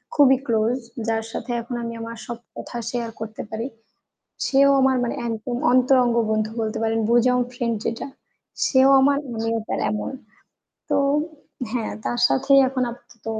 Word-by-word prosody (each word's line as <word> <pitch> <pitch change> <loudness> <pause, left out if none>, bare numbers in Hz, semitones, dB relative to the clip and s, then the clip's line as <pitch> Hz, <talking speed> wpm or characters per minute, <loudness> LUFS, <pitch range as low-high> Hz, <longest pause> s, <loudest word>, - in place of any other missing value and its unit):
খুবই 270 -2 +6
ক্লোজ। 225 +1 +1 0.3
যার 225 0 0
সাথে 250 - -5
এখন 240 +1 -6
আমি 230 0 -4
আমার 230 0 -6
সব 235 -1 -5 0.2
কথা 240 - -7
শেয়ার 235 -1 -3
করতে 220 0 -6
পারি। 225 +3 -3 0.8
সেও 275 +1 +5
আমার 265 0 +3
মানে 240 - -2
একদম 230 +2 -3 0.2
অন্তরঙ্গ 255 -1 +4 0.2
বন্ধু 215 0 0
বলতে 220 -1 -2
পারেন। 225 0 +1
বুজাম 250 +1 +4
ফ্রেন্ড 240 -2 -1
যেটা, 230 - -3 0.6
সেও 265 0 +5
আমার 280 +1 +4 0.2
আমিও 225 +1 -1
তার - - -1
এমন। 210 -1 -3 0.8
তো - - +2 0.7
হ্যাঁ, 235 -2 -2
তার 120 0 -1
সাথেই 275 - +4
এখন 255 -1 -2
আপাতত 235 -1 -16
235 Hz, 150 wpm, -23 LUFS, 225-255 Hz, 0.8 s, খুবই